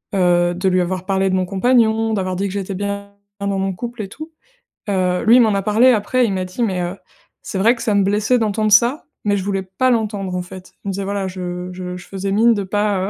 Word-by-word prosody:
heu, 175 -1 +3
de 185 +2 -1
lui 185 0 +2
avoir 185 +1 -3
parlé 195 0 +1
de 185 - +1
mon 185 0 +1
compagnon, 225 +2 +2
d'avoir 185 -2 -2
dit 195 +2 -1
que 190 - -6
j'étais 195 -1 -3
bien 200 +1 -4 0.3
dans 200 -1 -1
mon 195 0 0
couple 240 +4 -6
et 195 - -8
tout. 310 +9 -9 0.6
Heu, 185 -1 0
lui 225 +2 +7
il - - +7
m'en 220 -3 +3
a 195 - +1
parlé 220 +5 +4
après 245 +3 +2
il 220 - -1
m'a 185 -1 -2
dit: 185 +7 -3
«Mais 190 -5 0
heu, 175 +1 -3 0.5
c'est - - -5
vrai 230 +5 +4
que 235 - -7
ça 210 - +1
me 200 - +4
blessait 210 +5 +2
d'entendre 215 -1 0
ça, 235 +7 +4 0.2
mais 205 -1 +2
je 190 - -3
voulais 195 -1 -2
pas 190 +8 0
l'entendre, 210 -5 -1
en 180 - -1
fait». 185 +1 -11
Il - - -2
me - - -2
disait: 195 +1 -3
«Voilà, 200 -1 -2
je 180 -1 -5
je 180 0 -6
je 180 - -12
faisais 195 0 -4
mine 230 +4 +4
de 200 - -2
pas, 200 0 0
200 Hz, 255 wpm, -19 LUFS, 185-215 Hz, 0.6 s, lui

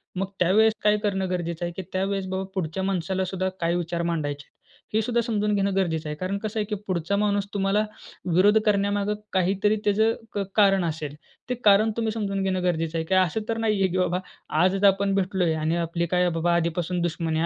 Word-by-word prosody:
मग 190 +1 -1
त्यावेळेस 215 +5 +4
काय 210 0 +4
करणं 195 -2 0
गरजेचं 175 -1 -2
आहे, 175 - -3
की - - -2
त्यावेळेस 195 0 -1
बाबा, 190 0 -2
पुढच्या 185 0 -2
माणसाला 190 0 -1
सुद्धा 190 0 -2
काय 170 +1 +1
विचार 170 -1 -2
मांडायचे 145 -4 -2
आहेत, - - -41 0.4
हे 220 - +3
सुद्धा 235 +1 +1
समजून 210 -3 0
घेणं 195 -1 0
गरजेचं 165 -5 0
आहे. 150 - -3
कारण 185 +4 -2
कसं 215 +1 -3
आहे, 210 - 0
की 210 0 -3
पुढचा 180 +1 -1
माणूस 205 -1 +1
तुम्हाला 200 +1 +1 0.5
विरोध 205 +5 +5
करण्यामागे 205 0 +1 0.2
काहीतरी 195 +3 +2
त्याचं 220 +2 +3 0.2
क - - -2 0.2
कारण 195 -3 +4
असेल, 150 -3 -4 0.3
ते 250 - 0
कारण 210 +2 +5
तुम्ही 225 -1 0
समजून 200 -3 -2
घेणं 185 -1 0
गरजेचं 165 -2 0
आहे, 160 - -2
की 190 - +1
असं 185 +3 +2
तर 225 - 0
नाही 220 -2 +1
आहे, 190 - +4
की 185 - -1
बाबा, 180 0 +1 0.4
आज 185 +2 +4
जर 200 +1 +4
आपण 195 0 +2
भेटलोय 185 -3 +1
आणि 160 +1 0
आपली 170 0 -1
काय 180 +1 +2
बाबा 170 +1 0
आधीपासून 170 +1 -1
दुश्मनी 165 -1 -1
आहे, 165 - +1
190 Hz, 210 wpm, -25 LUFS, 170-205 Hz, 0.5 s, विरोध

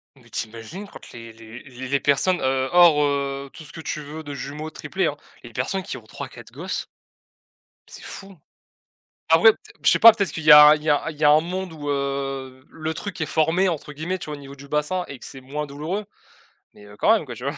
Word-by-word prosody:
Mais 120 -3 -21
tu - - -3
imagines 115 - -9
quant - - -12
les 115 -1 -10
les 115 +1 -12
les 130 -1 -9
les 140 +2 +1
personnes, 170 +7 +2
heu 130 0 +1
hors, 170 -4 +6
heu, 140 -1 -2
tout - - -11
ce 150 - -6
que - - -10
tu 155 - -4
veux, 150 +2 -8
de 145 -1 -7
jumeaux, 140 +3 -6
triplés, 190 +3 -3
hein. 145 - -3 0.3
Les 120 -1 -12
personnes 160 - -2
qui 195 - -6
ont - - -13
3-4 - - -10
gosses. - - -5 1.0
C'est - - -12
fou. 195 -1 -10 0.9
Après, 165 +8 +7
peut-êt - - -19
je - - +8
sais - - +3
pas, 230 0 +10
peut-être 200 -3 -2
qu'il 160 - -5
y 155 - +9
a 150 0 +10
il 150 - -11
y 155 - 0
a 145 +2 +1
il 155 - -11
y 150 - -1
a 145 - +7
un 150 +1 +6
monde 180 +1 -5
où 145 -2 -7
heu, 135 -2 -3
le 160 0 -5
truc 195 +2 -6
est 155 - 0
«formé» 165 +5 +2
entre 155 -3 -4
guillemets, 160 +6 -4
tu - - -8
vois? 150 - -5
Au - - -12
niveau 140 0 -11
du 140 0 -12
bassin 150 +5 -1
et 135 - -8
que - - -13
c'est 135 - -9
moins 145 +3 -5
douloureux 155 +9 -4 0.7
mais 105 - -16
heu, 105 0 -14
quand 220 - +4
même, 215 - -1
quoi, 125 - -8
tu 120 - -10
vois? 140 +2 -3
150 Hz, 245 wpm, -23 LUFS, 135-165 Hz, 1.0 s, pas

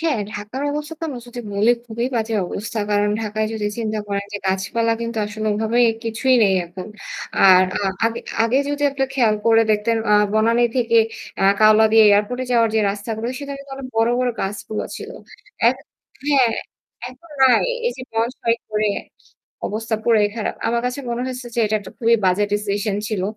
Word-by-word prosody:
হ্যাঁ, 320 -7 0
ঢাকার 210 +6 -6
অবস্থা 300 +2 -4
আমরা 260 -5 -6
যদি 245 0 -7
বলি 205 +4 +3 0.2
খুবই 235 +1 -2
বাজে 225 0 -1
অবস্থা। 215 +4 -5
কারণ 205 0 +2
ঢাকায় 215 0 -1
যদি 215 -2 -2
চিন্তা 220 -1 -2
করেন 200 0 -2
যে 205 - -3
গাছপালা 200 +5 0
কিন্তু 230 -1 -3
আসলে 215 +1 -5
ওভাবে 220 +3 0 0.3
কিছুই 230 +3 +1
নেই 195 -2 +4
এখন। 175 +2 -9 0.5
আর 185 -1 +7 0.4
আগে 230 0 0 0.2
আগে 230 +3 +2
যদি 290 0 -2
আপনি 270 -1 -1
খেয়াল 235 -5 +3
করে 225 0 +6
দেখতেন 215 +2 +1
আ - - +5 0.2
বনানি 230 +2 +3
থেকে 230 -2 +2 0.4
আ - - +1 0.2
কাওলা 215 +1 +6
দিয়ে 225 - +7
এয়ারপোর্ট 205 +5 +2
এ - - -3
যাওয়ার 230 -1 +4
যে 220 - +3
রাস্তাগুলো 220 +3 -4
সেখানে 280 -1 -6
তো - - -9 0.2
বড় 225 +1 +3
বড় 250 -1 +1
গাছগুলো 205 +2 -4
ছিল। - - -8 0.6
এ - - +9 0.6
হ্যাঁ। 265 -6 +3 0.5
এখন 260 +7 -16
নাই। 260 -2 +5 0.2
এই 485 - +1
যে - - -8
বনসাই 230 +1 0
করে 215 0 0 0.8
অবস্থা 220 +1 -3
পুরাই 215 -3 +4
খারাপ। 220 - -2
আমার 235 +1 +1
কাছে 250 +3 -3
মনে 235 0 -2
হয়েছে 255 -1 -6
যে - - -4
এটা 215 - -1
একটা 200 - -11
খুবই 230 -2 +4
বাজে 185 +3 +3
ডিসিশন 205 0 -1
ছিল। 210 -5 -2
225 Hz, 175 wpm, -21 LUFS, 210-240 Hz, 0.8 s, এ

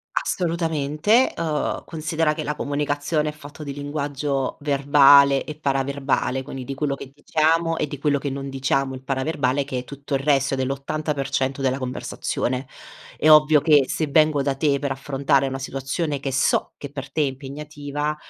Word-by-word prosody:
Assolutamente, 165 - +1
uhm, 155 -3 -2
considera 160 -1 -1
che 155 - -4
la 150 - -2
comunicazione 145 +1 -1
è - - -3
fatto 150 0 -11
di 140 -2 -5
linguaggio 145 -1 -3
verbale 140 -1 +5
e 150 - -7
paraverbale, 135 -2 -1
quindi 130 -1 -7
di 135 - -5
quello 140 0 -1
che 135 -1 -8
diciamo 160 +3 +1
e - - -1
di 145 - -6
quello 140 0 +1
che 140 - -3
non 135 0 -5
diciamo, 135 0 -1
il 130 - -8
paraverbale, 135 0 0
che 135 -2 -4
è 125 - -6
tutto 140 +2 -8
il 135 - +2
resto, 140 -1 +2
è 135 - 0
dell'80% 135 0 -2
della 130 0 +1
conversazione. 130 0 -3 0.5
È - - +1
ovvio 150 0 +7
che 145 -4 +5
se 160 - -1
vengo 155 -1 +3
da 140 0 +1
te 140 0 +1
per 140 0 -3
affrontare 135 0 +1
una 135 0 -3
situazione 135 +3 -3
che 135 -1 -3
so 135 +2 +1
che 140 - -8
per 140 -1 -7
te 155 - 0
è - - +3
impegnativa, 145 +2 -4
140 Hz, 175 wpm, -23 LUFS, 135-150 Hz, 0.5 s, ovvio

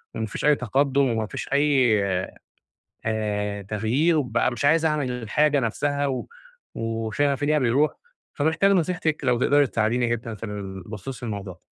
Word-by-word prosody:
و - - -4
ما 110 - -1
فيش 105 - -5
أي 150 0 +6
تقدّم 135 +3 +1
وما 110 -2 -1
فيش - - -6
أي 135 -7 +3 1.0
آآ 105 -2 -2
تغيير 115 - +1
وبقى 125 -5 +1
مش 125 +3 -2
عايز 160 +2 +4
أعمل 150 -5 0
الحاجة 140 +5 +1
نفسّها 140 +4 -1
و 130 -2 -3 0.5
وشغفي 115 +6 -1
فيها 150 +1 +2
بيرُوح، 135 +4 +2 0.4
فمحتاج 160 +7 +2
نصيحتِك 175 -4 0
لو 125 -2 +2
تقدري 145 +2 +4
تساعديني 115 +3 0
جدًا 115 -1 -3
في 110 - -7
ال 100 -3 -6
بخصوص 115 +5 -7
الموضوع 100 -4 -5
ده. 90 - -24
125 Hz, 160 wpm, -24 LUFS, 110-145 Hz, 1.0 s, أي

